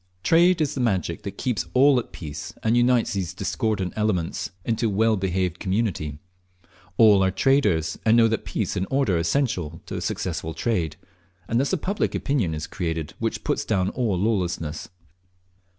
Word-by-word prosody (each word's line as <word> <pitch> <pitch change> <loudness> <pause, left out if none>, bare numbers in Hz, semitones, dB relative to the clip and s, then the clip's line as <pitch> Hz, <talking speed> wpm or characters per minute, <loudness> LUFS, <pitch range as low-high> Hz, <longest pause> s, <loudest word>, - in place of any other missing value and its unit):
Trade 170 +1 +4
is 150 - 0
the 130 - -2
magic 95 -8 0
that 100 -1 -7
keeps 125 -6 -1
all 135 0 +6
at 120 - -8
peace, 75 -3 -7
and 110 +2 +2
unites 120 -1 +3
these 95 -4 -3
discordant 100 -5 -1
elements 100 -6 -1 0.2
into 115 0 0
a - - +1
well 110 +2 +2
behaved 90 -2 -1
community. 95 -7 -1 0.8
All 105 -4 +6
are 95 - +3
traders, 95 - +1
and 115 +1 +4
know 115 -1 +6
that 110 -1 -1
peace - - -2
and 95 - -1
order 135 -7 +1
are - - +1
essential 85 - -1
to - - -5
successful 80 0 -3
trade, 85 -10 -1 0.5
and 115 - +1
thus 140 - 0
a 190 - +2
public 195 +6 -1
opinion 115 - 0
is 75 - -4
created 80 -5 -4
which - - -2
puts - - 0
down 95 -3 0
all 115 -7 -1
lawlessness. 90 -6 -1
105 Hz, 170 wpm, -24 LUFS, 90-120 Hz, 0.8 s, all